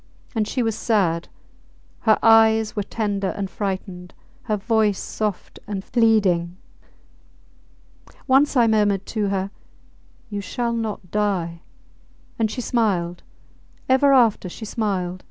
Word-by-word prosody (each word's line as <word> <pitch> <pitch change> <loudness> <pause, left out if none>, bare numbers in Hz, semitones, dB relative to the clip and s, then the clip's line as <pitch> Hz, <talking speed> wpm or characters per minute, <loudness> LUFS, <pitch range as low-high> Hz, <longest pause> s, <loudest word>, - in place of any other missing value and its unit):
And 220 -3 0
she 250 - -1
was 225 -2 -1
sad! 180 -7 0 0.7
Her 220 -2 +3
eyes 220 -1 +5
were 210 - 0
tender 200 -1 -2
and 195 -2 -4
frightened; 185 -2 -5 0.3
her 215 - 0
voice 215 -1 +1
soft 210 -3 -4
and 195 -2 -4
pleading. 195 -7 +2 1.7
Once 275 +1 +3
I 240 - +6
murmured 205 -3 +2
to 215 -3 -2
her, 195 0 -2 0.8
You 205 -3 -4
shall 235 +4 -2
not 215 -5 -4
die, 185 -5 -1 0.8
and 220 -1 +2
she 250 - -4
smiled... 190 -8 0 0.7
ever 265 +2 +4
after 230 -8 +3
she 220 - -8
smiled! 190 -5 -2
210 Hz, 120 wpm, -22 LUFS, 190-225 Hz, 1.7 s, I